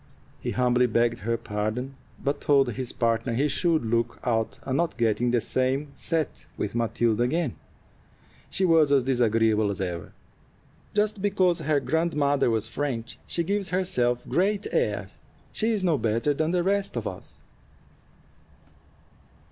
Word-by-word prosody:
He - - -4
humbly 125 0 +2
begged 115 +1 +1
her 115 +4 -1
pardon, 110 +4 -3 0.3
but 140 +1 -1
told 135 -4 +3
his 125 +3 -4
partner 115 0 0
he 140 +5 +2
should 160 -1 +1
look 115 +1 0
out 115 -2 0
and 130 - -2
not 170 +3 0
get 115 -2 +1
in 125 - +2
the 120 0 +3
same 130 +5 -1
set 160 -4 -3
with - - -3
Matilda 115 -1 +1
again; 135 +2 0 0.9
she 190 - +1
was 160 -4 +4
as 140 -3 +4
disagreeable 115 -4 +2
as 100 - -4
ever. 85 -4 -4 0.8
"Just 210 -1 +1
because 185 -3 +2
her 155 -2 +1
grandmother 145 -4 +1
was 110 -1 0
French, 120 -2 -4
she 170 - -1
gives 200 +2 -1
herself 175 -10 0
great 200 +3 +1
airs. - - -1 0.3
She 220 - 0
is 210 -4 0
no 165 -6 +2
better 115 +6 +1
than 155 +2 0
the 175 0 +1
rest 200 +1 0
of - - -3
us." - - -7
130 Hz, 150 wpm, -26 LUFS, 115-165 Hz, 0.9 s, was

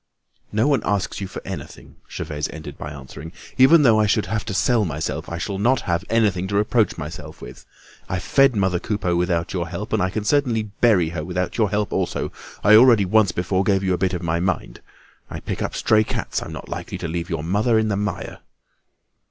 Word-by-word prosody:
"No 110 +5 +2
one 140 -6 +2
asks 100 0 -1
you 95 - -3
for - - -8
anything," 90 -8 -8
Gervaise 75 -3 -4
ended 80 -1 -8
by 75 - -7
answering. 70 +3 -9 0.3
"Even 150 +5 +7
though 115 -5 +5
I 105 - +3
should - - +1
have 110 -1 -2
to 110 - -4
sell 120 0 +2
myself, 80 -4 -3
I'll 90 +4 -4
not 120 +5 +2
have 85 +1 -1
anything 105 -5 +1
to 100 - -3
reproach 105 +2 +2
myself 80 +1 -8
with. - - -11 0.4
I've 90 -1 -2
fed 135 -3 +4
mother 95 -3 +1
Coupeau 95 -3 -1
without 85 0 0
your 85 -3 -2
help, 95 +6 -6
and 110 - +2
I 95 - +1
can 105 +2 -3
certainly 120 -2 +1
bury 105 -4 +2
her 80 -2 -4
without 90 +2 -3
your 110 -3 +3
help 105 +1 -1
also. - - -2 0.3
I 105 - +6
already 115 -2 +7
once 105 0 +3
before 95 +2 0
gave 95 0 +1
you 95 -1 +1
a - - 0
bit 95 0 0
of 90 - -5
my 85 0 0
mind; 90 -8 -2 0.5
I - - -6
pick - - -5
up - - -3
stray 110 0 +3
cats, - - -3
I'm - - -7
not - - -8
likely - - -5
to - - -4
leave 85 +2 -4
your 80 -3 -3
mother 105 +7 +2
in 110 0 +1
the 100 - 0
mire." 105 -2 -4
95 Hz, 215 wpm, -22 LUFS, 85-110 Hz, 0.5 s, Even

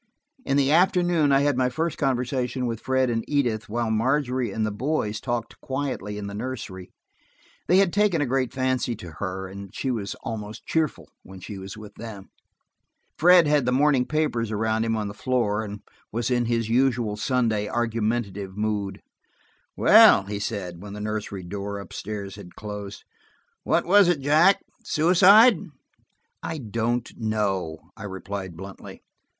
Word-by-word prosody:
In 140 - +1
the 140 0 +3
afternoon 175 -3 +3
I 135 0 +5
had 145 -1 +2
my 125 0 +2
first 160 +5 -2
conversation 125 -1 -1
with 115 -2 -3
Fred 130 0 +1
and 115 -1 -1
Edith, 120 -8 0
while 115 0 -1
Margery 125 0 0
and 110 +1 -1
the 110 - -2
boys 110 -2 -2
talked 120 -2 -4
quietly 130 -7 -3
in 105 - -5
the 100 - -6
nursery. 105 -5 -6 0.8
They 180 - +5
had 195 -3 +3
taken 205 -5 +2
a 145 - +1
great 130 -1 0
fancy 130 -2 -1
to 90 -5 -10
her, 95 -1 -4
and 100 +1 -9
she 135 - -1
was 105 -5 -3
almost 110 -2 -6
cheerful 160 -2 -1
when 95 0 -12
she 100 +2 -8
was 95 +2 -8
with 105 -1 -11
them. 105 -4 -9 0.9
Fred 175 +1 +7
had 145 -4 +2
the - - +3
morning 135 -1 +3
papers 150 -8 0
around 110 +1 0
him 115 0 0
on 105 -1 -2
the 100 - -6
floor, 110 -3 0
and 105 -1 -7 0.3
was 120 +3 -2
in 120 -1 +2
his 115 -1 0
usual 120 -3 +1
Sunday 110 -2 0
argumentative 110 -4 -2
mood. 105 -2 -2 0.7
"Well," - - +7
he 100 +1 -5
said, 95 -5 -4
when 100 0 -8
the 105 - -7
nursery 105 -2 -4
door 100 +2 -5
up 100 - -10
stairs 100 -1 -6
had 90 -4 -12
closed, 105 -1 -7 0.6
"what - - +1
was 200 +1 +6
it, 175 -5 +1
Jack? 155 +8 +4 0.2
Suicide?" 195 +8 +6 0.8
"I 160 - -4
don't 115 -1 -2
know," 100 -7 -1 0.2
I 105 - -9
replied 95 -2 -6
bluntly. 95 +1 -10
115 Hz, 165 wpm, -25 LUFS, 105-135 Hz, 0.9 s, Fred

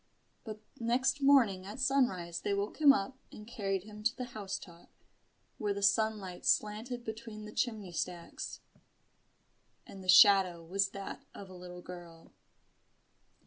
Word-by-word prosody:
But 215 -2 -8 0.2
next 250 +4 +1
morning 245 -10 +4
at 210 +5 -8
sunrise 215 -11 +1
they 200 - 0
woke 200 +1 -3
him 290 -2 +9
up 260 +2 -1
and 210 - -11
carried 200 -5 -3
him 210 0 -11
to 210 - 0
the 255 - -3
house 200 -3 -4
top, 170 -2 -14 0.7
where 205 -1 -1
the 200 - -4
sunlight 200 -3 +1
slanted 225 +4 0
between 220 -1 -7
the 210 - -9
chimney 215 -7 -2
stacks: 175 0 -5 1.2
and 195 -1 -11
the 185 - -8
shadow 185 -3 +7
was 195 +3 +1
that 195 0 -7
of 195 -2 -10
a - - -10
little 180 0 -10
girl. 175 -2 -11
200 Hz, 145 wpm, -32 LUFS, 185-225 Hz, 1.2 s, him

